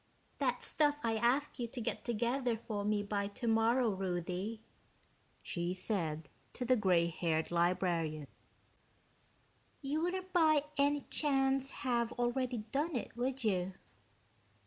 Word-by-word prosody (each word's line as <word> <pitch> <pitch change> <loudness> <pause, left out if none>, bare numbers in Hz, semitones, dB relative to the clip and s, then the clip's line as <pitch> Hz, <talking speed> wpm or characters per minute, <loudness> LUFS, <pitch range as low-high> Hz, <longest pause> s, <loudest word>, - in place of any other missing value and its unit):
"That - - 0
stuff 295 -1 +2
I 225 -1 +1
asked 245 +6 +1
you 240 - -1
to 245 - -7
get 225 - -3
together 240 +1 0
for 215 -2 -4
me 205 0 +1
by 200 -1 -1
tomorrow, 225 +3 +2
Ruthie," 185 +3 -3 0.8
she 175 +1 -2
said 165 -6 -1 0.3
to 250 - -4
the 255 +1 +4
gray 185 -6 +3
haired 165 -1 -1
librarian. 170 -3 +1 1.6
"You 290 +3 -1
wouldn't 370 +2 -2
by 310 -4 +5
any 285 0 +2
chance 270 -2 +2 0.2
have 235 -2 +1
already 245 -1 -1
done 300 +3 0
it, 240 - -4
would 255 +2 -2
you?" 190 -3 0
230 Hz, 125 wpm, -34 LUFS, 185-270 Hz, 1.6 s, by